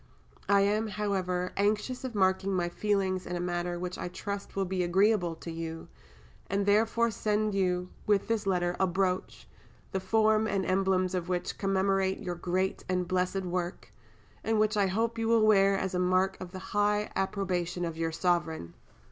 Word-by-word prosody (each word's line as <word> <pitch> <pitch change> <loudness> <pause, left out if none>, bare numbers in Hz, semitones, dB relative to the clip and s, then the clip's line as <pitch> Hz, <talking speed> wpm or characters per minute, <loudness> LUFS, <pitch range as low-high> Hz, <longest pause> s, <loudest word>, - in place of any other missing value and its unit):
I 200 0 +5
am, 210 +2 +1
however, 190 -3 -1
anxious 210 +6 0
of 255 -3 -5
marking 190 0 +2
my 175 -1 0
feelings 190 -1 0
in 180 - -3
a - - -2
manner 175 0 -2
which 180 +1 -5
I - - -3
trust 200 +3 -6
will 195 -1 0
be 185 0 -1
agreeable 180 0 +2
to 165 - -8
you, 165 0 -6 0.6
and 200 +1 0
therefore 225 +3 +3
send 210 0 0
you 180 -2 0 0.2
with 205 -2 +2
this 225 -3 -1
letter 175 -2 +1
a 190 - +3
brooch, 185 0 -1 0.4
the 190 - -1
form 220 +2 +3
and 195 -2 0
emblems 185 -1 +1
of 180 -1 -2
which 180 -1 -2
commemorate 195 -1 +1
your 180 -4 -4
great 185 +2 -1
and 180 -1 0
blessed 185 +1 0
work, 180 0 -4 0.5
and 220 0 +1
which, 215 0 +2
I 200 -2 +3
hope, 230 +4 -1
you 225 - 0
will 225 -1 +4
wear 195 -2 +5
as 190 -1 -2
a 180 - 0
mark 185 +1 +2
of 180 -1 -7
the 190 - -7 0.2
high 205 0 +1
approbation 180 -3 -1
of 165 -1 -4
your 165 0 -1
Sovereign! 160 - -1
190 Hz, 180 wpm, -29 LUFS, 180-205 Hz, 0.6 s, I